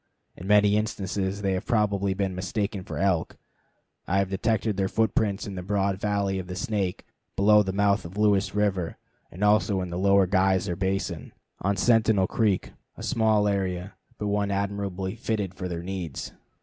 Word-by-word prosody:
In 95 - -9
many 105 0 +5
instances 100 -2 -2
they 95 -1 +1
have 95 +2 -3
probably 100 -4 +1
been 95 -1 -1
mistaken 100 +1 -3
for - - -6
elk. 90 -4 0 0.7
I 95 - +1
have 100 -1 +1
detected 110 +1 0
their 95 0 0
footprints 105 -1 0
in 100 - -6
the 90 - -5
broad 100 0 0
valley 100 -2 0
of 90 - -6
the 90 - -5
Snake, 100 -4 -2 0.3
below 105 +1 +5
the 95 -2 -1
mouth 100 +1 +2
of 85 +4 -9
Lewis 105 -2 +2
River, 95 -5 0 0.3
and 90 +4 -6
also 105 -1 +3
in 90 -1 -4
the 85 - -3
Lower 100 0 +4
Geyser 95 0 +1
Basin, 95 -4 -2 0.3
on 100 +1 0
Sentinel 110 -3 +3
Creek, 105 -2 0 0.3
a - - -8
small 110 -2 +2
area, 95 -1 -2 0.2
but 105 - -4
one 100 0 0
admirably 100 -1 -2
fitted 110 -4 -2
for 90 0 -5
their 85 -1 -5
needs. 90 -5 -5
100 Hz, 175 wpm, -26 LUFS, 95-105 Hz, 0.7 s, many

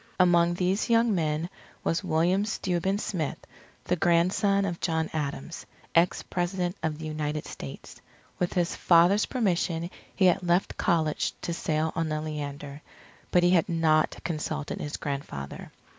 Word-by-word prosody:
Among 175 -1 +4
these 185 +5 0
young 230 -1 +4
men 160 -2 0 0.4
was 165 +4 0
William 175 +3 +2
Steuben 190 -2 -1
Smith, 175 -7 -2 0.5
the 180 - 0
grandson 185 +4 +2
of 175 -3 -3
John 160 -2 -1
Adams, 140 - -4 0.3
ex 170 +1 +3
President 180 0 -2
of 160 -2 -2
the 160 - -7
United 150 -1 -3
States. 70 - -9 0.4
With 180 - 0
his 175 -2 0
father's 175 +4 +4
permission 175 -7 0 0.2
he 190 - +3
had 180 +1 +4
left 175 +1 +1
college 160 -3 0
to 170 - -2
sail 155 -1 -1
on 165 -1 -1
the 155 0 -1
Leander; 145 -1 -6 0.5
but 180 - +3
he 175 - +5
had 175 -3 +3
not 160 -2 +2
consulted 155 -3 -3
his 150 - -4
grandfather. 140 - -5
170 Hz, 145 wpm, -27 LUFS, 155-180 Hz, 0.5 s, he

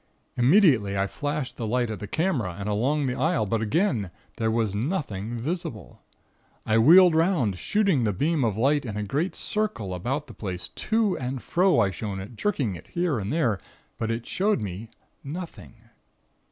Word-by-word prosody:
Immediately 125 - +4
I 95 - +2
flashed 145 +5 -4
the 115 - -3
light 120 0 0
at 110 - -5
the 105 - -6
camera, 130 - -1
and 100 - -4
along 130 +8 +1
the 125 - 0
aisle, 150 -3 +1
but 110 +2 -1
again 110 - +1 0.3
there 110 -1 0
was 110 -3 0
nothing 115 - -3
visible. 125 - -5 0.6
I 110 0 +3
wheeled 175 +8 +8
'round, 160 - +2
shooting 195 - +2
the 105 - +2
beam 145 - 0
of 110 -3 0
light 140 +5 +2
in 110 -5 -5
a 105 - -2
great 145 - -1
circle 210 - -2
about 130 - -2
the 120 - -12
place; 95 -5 -5
to 220 -3 0
and 130 +1 -3
fro 180 +3 +2
I 100 -3 +2
shone 95 +1 -5
it, 100 +5 -8
jerking 140 - -1
it - - -12
here 170 -8 -1
and 100 +3 -3
there, 125 - +1 0.4
but 115 - -1
it 115 +1 -2
showed 205 +3 +1
me 105 +2 -6 0.3
nothing. 165 -4 -8
125 Hz, 180 wpm, -26 LUFS, 105-165 Hz, 0.6 s, wheeled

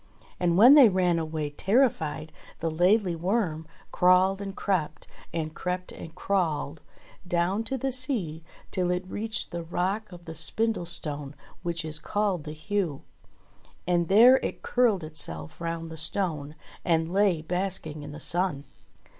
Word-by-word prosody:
And 175 -1 +2
when 240 +7 +9
they 280 -6 +9
ran 180 -3 +2
away 155 -2 -3
terrified, 160 - 0 0.3
the 165 0 -1
Laidly 180 +3 +3
Worm 170 -3 -1 0.2
crawled 185 +2 +4
and 195 -1 -6
crept, 165 -6 -2 0.3
and 155 -1 -3
crept 180 +1 -4
and 165 0 -10
crawled 160 -6 -1 0.5
down 175 +5 0
to 265 +4 -2
the 270 +1 -2
sea 230 - -2 0.3
till 180 -1 0
it 180 +1 -1
reached 220 +3 -4
the 170 - -4
rock 190 +5 -2
of 175 -1 -12
the 165 - -7
Spindlestone 160 -6 -2 0.3
which 170 -2 -3
is 155 0 0
called 200 -5 -1
the 150 - -6
Heugh. 170 -2 -2 0.8
And 175 -1 +1
there 235 +7 +7
it - - -5
curled 230 -8 +2
itself 80 - -5
round 165 -1 -4
the 160 - -8
stone, 160 -3 -1 0.3
and 165 0 +1
lay 190 -5 +2
basking 180 -3 -2
in 145 0 -8
the 150 - -9
sun. 175 -4 0
175 Hz, 145 wpm, -27 LUFS, 160-195 Hz, 0.8 s, when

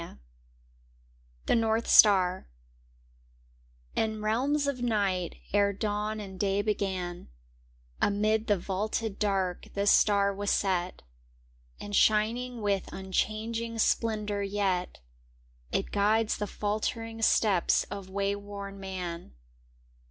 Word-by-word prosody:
^M - - -10 1.3
1 - - +2
Zhc - - +1
Bortb 225 +1 0
Star 190 -3 +5 1.5
N 220 -1 0
realms 270 +7 +1
of 280 -3 -2
night, 200 -7 0 0.2
ere 200 0 +3
dawn 210 +1 -2
and 190 -3 -8
day 200 0 +1
began, 190 -4 -3 0.7
Amid 215 +2 +1
the 205 -2 +3
vaulted 205 +3 -3
dark 190 -4 -1
this 200 +1 +3
star 200 -1 +4
was 200 +1 -3
set, 185 -2 0 0.8
And 205 0 -5
shining 230 +4 +2
with 200 -2 -1
unchanging 220 +4 -2
splendor 215 -2 0
yet 195 -3 -1 0.7
It - - -1
guides 215 +2 +2
the 210 - -3
faltering 225 +3 -3
steps 205 -5 +3
of 200 -2 -6
wayworn 200 0 -4
man. 180 - -6
205 Hz, 105 wpm, -29 LUFS, 195-220 Hz, 1.5 s, Star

